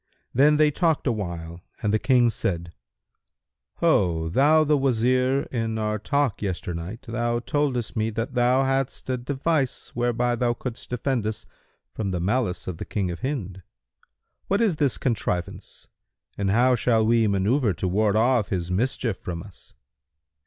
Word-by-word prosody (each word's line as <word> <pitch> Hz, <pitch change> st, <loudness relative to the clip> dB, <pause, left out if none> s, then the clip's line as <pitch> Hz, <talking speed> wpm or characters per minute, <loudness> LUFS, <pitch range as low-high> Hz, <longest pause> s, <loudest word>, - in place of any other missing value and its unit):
Then 150 Hz, +4 st, +5 dB
they 150 Hz, 0 st, +4 dB
talked 160 Hz, 0 st, +1 dB
awhile 85 Hz, -, -3 dB, 0.2 s
and 105 Hz, -1 st, +1 dB
the 110 Hz, -, +3 dB
King 125 Hz, -2 st, +3 dB
said, 85 Hz, -5 st, -3 dB, 1.1 s
"Ho, 80 Hz, -4 st, +2 dB
thou 150 Hz, -, +4 dB
the 150 Hz, 0 st, +3 dB
Wazir,[FN#171] 130 Hz, +1 st, +1 dB
in 115 Hz, -2 st, -1 dB
our 105 Hz, 0 st, -1 dB
talk 140 Hz, +1 st, 0 dB
yesternight 90 Hz, +1 st, -4 dB
thou 120 Hz, 0 st, -1 dB
toldest 125 Hz, -2 st, -1 dB
me 110 Hz, 0 st, 0 dB
that 115 Hz, +4 st, -4 dB
thou 125 Hz, +2 st, +3 dB
hadst 135 Hz, -1 st, -1 dB
a 130 Hz, -, 0 dB
device 135 Hz, +2 st, -1 dB
whereby 120 Hz, 0 st, 0 dB
thou 120 Hz, 0 st, 0 dB
couldst 120 Hz, -1 st, -7 dB
defend 125 Hz, -2 st, -1 dB
us 110 Hz, -, -5 dB, 0.5 s
from 105 Hz, -3 st, -3 dB
the 90 Hz, -2 st, -2 dB
malice 100 Hz, +1 st, -1 dB
of 90 Hz, -3 st, -4 dB
the -, -, -6 dB
King 95 Hz, -4 st, -2 dB
of 85 Hz, -, -6 dB
Hind. 105 Hz, -9 st, -4 dB, 0.9 s
What 200 Hz, -, +1 dB
is 205 Hz, -9 st, +2 dB
this 145 Hz, -5 st, +1 dB
contrivance 95 Hz, -8 st, -3 dB, 0.5 s
and 100 Hz, -1 st, -1 dB
how 125 Hz, +5 st, +4 dB
shall 115 Hz, -2 st, +2 dB
we 115 Hz, 0 st, +3 dB
manњuvre 100 Hz, -, +1 dB
to 95 Hz, -, -1 dB
ward 105 Hz, +2 st, +2 dB
off 115 Hz, -1 st, +2 dB
his 90 Hz, -2 st, -2 dB
mischief 115 Hz, +1 st, -1 dB
from 85 Hz, -2 st, -5 dB
us? 100 Hz, -3 st, -16 dB
115 Hz, 155 wpm, -25 LUFS, 100-130 Hz, 1.1 s, Then